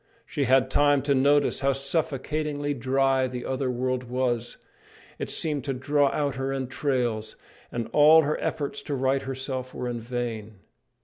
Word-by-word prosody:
She 140 - -2
had 130 +1 +3
time 145 0 +3
to 140 0 +2
notice 145 +2 +3
how 140 0 +2
suffocatingly 145 +1 -2
dry 135 0 +1
the 125 -1 -6
other 130 0 -1
world 125 0 -1
was. 120 -1 -2 0.6
It - - -4
seemed 150 -4 -1
to 135 - -1
draw 145 +3 +2
out 145 -3 -1
her 135 0 -2
entrails, 130 -4 -2 0.4
and 115 -2 -3
all 155 +2 +7
her 150 +1 -1
efforts 145 -2 -2
to 145 - -3
right 135 +1 +1
herself 130 -1 -5
were 125 - -3
in 120 -1 -3
vain. 115 -2 -4
135 Hz, 160 wpm, -26 LUFS, 125-145 Hz, 0.6 s, all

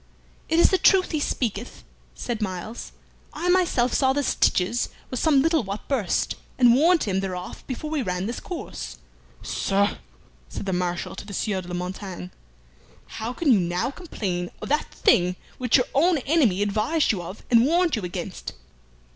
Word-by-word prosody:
"It 325 - +2
is - - +6
the 380 - +3
truth 375 -2 +4
he 310 - 0
speaketh," 240 -5 -3 0.3
said 235 -3 -4
Myles. 200 +3 -5 0.4
"I 355 - -2
myself 340 -10 +3
saw 265 -1 +3
the 285 +1 0
stitches 215 -1 +1 0.2
were 255 - -2
some 280 -1 +4
little 325 -1 +3
what 200 +1 -6
burst, 240 -10 0 0.2
and 245 -2 +6
warned 330 +6 +4
him 190 -2 0
thereof 185 -2 -5
before 290 +4 -5
we 310 -3 0
ran 180 -4 -2
this 235 +3 -3
course. 355 - -7 0.5
"Sir," 200 +1 0 0.5
said - - -6
the 190 - -1
Marshal 180 -1 -2
to - - -7
the 200 - -6
Sieur 195 -3 -1
de 175 - -12
la 180 - -4
Montaigne, 180 0 -5 0.9
"how 225 +2 -3
can 290 +2 +1
you 210 - +4
now 175 +7 -1
complain 190 - -4
of - - -7
that 300 +2 0
thing 180 0 +3 0.2
which 250 0 +4
your 250 - +2
own 330 +5 +4
enemy 260 - +2
advised 220 +11 +1
you 195 -5 -3
of 185 +4 -9
and 230 -1 +6
warned 345 0 +3
you 220 - -3
against? 180 0 -5
230 Hz, 175 wpm, -24 LUFS, 185-290 Hz, 0.9 s, is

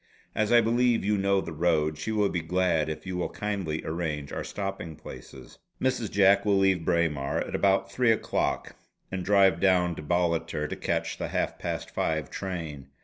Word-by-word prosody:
As 110 0 0
I 120 0 +7
believe 120 0 +2
you 105 +1 +2
know 100 -1 +2
the 85 - -6
road, 80 -1 +1
she 95 +8 -4
will 105 -2 +2
be 90 - -2
glad 85 -2 +1
if 75 0 -6
you 95 -1 -4
will 90 - -1
kindly 95 -7 -3
arrange 80 -3 -3
our - - -3
stopping 95 -5 -5
places. 65 -3 -12 0.2
Mrs. 125 -5 0
Jack 100 0 +4
will 100 -2 +3
leave 95 -3 +3
Braemar 80 -5 0
at - - -5
about 95 0 +2
three 120 +3 +3
o'clock 110 - -1 0.4
and 95 -1 -3
drive 95 -3 +4
down 90 -2 +3
to - - -5
Ballater 85 -1 0
to - - -4
catch - - -2
the - - -2
half - - -2
past - - -4
five 80 -4 -1
train. 80 -8 -5
90 Hz, 185 wpm, -27 LUFS, 80-100 Hz, 0.4 s, I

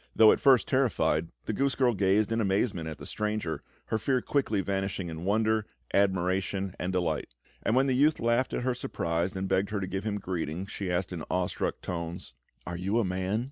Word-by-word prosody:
Though 110 -1 +8
at - - +2
first 135 -4 +5
terrified, 115 - +2 0.2
the - - -1
goose 135 0 +1
girl 125 -3 +3
gazed 100 +2 +2
in 115 0 +1
amazement 95 -4 0
at 80 - -7
the - - -9
stranger, 105 -6 -2 0.3
her 110 - +1
fear 130 +3 +1
quickly 125 -6 0
vanishing 95 -2 -2
in 80 +1 -6
wonder, 110 +2 +2 0.3
admiration, 95 0 +1
and 90 - -1
delight; 80 -8 -1 0.3
and 115 - +1
when 130 +1 +4
the 135 - +2
youth 150 +4 +4
laughed 120 +3 +2
at - - -2
her 130 0 +1
surprise 85 -7 -2
and 95 0 -2
begged 95 +1 +1
her 105 - -1
to 95 - -2
give 95 +1 -3
him 105 -1 -1
greeting, 90 -2 -3
she 100 -1 -5
asked 90 +1 -1
in 85 -3 -5
awestruck 90 -1 -1
tones: 85 -5 -5 0.3
"Are 85 0 -4
you 95 +5 0
a 115 - +2
man?" 95 +3 -1
95 Hz, 205 wpm, -29 LUFS, 90-110 Hz, 0.3 s, Though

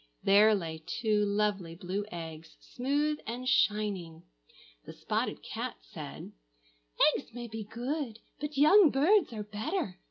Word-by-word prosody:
There 210 +2 +6
lay 160 -4 -4
two 210 +3 0
lovely 200 -4 0
blue 185 +4 -3
eggs, 165 -1 -8
smooth 290 +4 -1
and 245 +3 -4
shining. 200 -9 +1 0.6
The - - -10
spotted - - -2
cat - - -4
said, - - -9 0.8
"Eggs 275 - -6
may 240 -1 -5
be 220 -1 -6
good, 240 +2 -4 0.2
but 295 0 -5
young 315 +5 +7
birds 330 +8 +3
are 215 -2 -5
better. 210 - -3
215 Hz, 130 wpm, -30 LUFS, 190-270 Hz, 0.8 s, young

